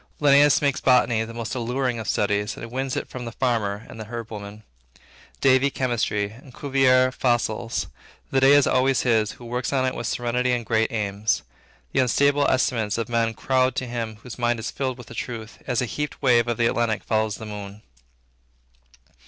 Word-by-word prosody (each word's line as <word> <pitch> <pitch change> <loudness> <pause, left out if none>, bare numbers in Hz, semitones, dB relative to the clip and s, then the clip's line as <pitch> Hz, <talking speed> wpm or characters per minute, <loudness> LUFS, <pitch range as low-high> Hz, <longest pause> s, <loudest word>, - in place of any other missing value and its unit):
Linnaeus 145 0 +5
makes 140 -2 +1
botany 120 -3 +3
the 115 - -9
most 115 -1 -4
alluring 125 0 -1
of 110 - -6
studies, 105 +1 0
and 115 - -8
wins 130 +1 -2
it - - -3
from 125 -1 -7
the 115 - -5
farmer 110 -4 -1
and 110 - -11
the 110 - -6
herb 115 +1 -7
woman; 105 0 -8 0.8
Davy, 130 +1 +4
chemistry; 115 -6 -1
and 125 +3 -15
Cuvier, 130 -2 +3
fossils. 120 -2 0 0.5
The 135 - +3
day 135 +1 +6
is 145 -1 +6
always 130 0 +2
his, 110 -4 +1
who 120 - -13
works 125 +1 -3
in 135 -2 +1
it 130 - 0
with 120 - -4
serenity 125 +1 0
and 120 -2 -2
great 110 0 +1
aims. 100 - -1 0.5
The - - +1
unstable 140 +3 +3
estimates 115 -5 +1
of 115 -1 -3
men 115 -1 0
crowd 130 +1 +1
to 130 - -2
him 115 -2 -4
whose 125 -1 -9
mind 120 0 +1
is 110 - -4
filled 130 -2 -3
with 125 - -12
a - - -7
truth, 110 0 -6
as 125 - -1
the 125 - +2
heaped 150 +5 -4
waves 120 -3 +3
of 120 - -1
the 120 - +2
Atlantic 115 -2 0
follow 110 -1 +1
the 105 +1 -6
moon. 105 0 -8
120 Hz, 195 wpm, -24 LUFS, 110-130 Hz, 0.8 s, day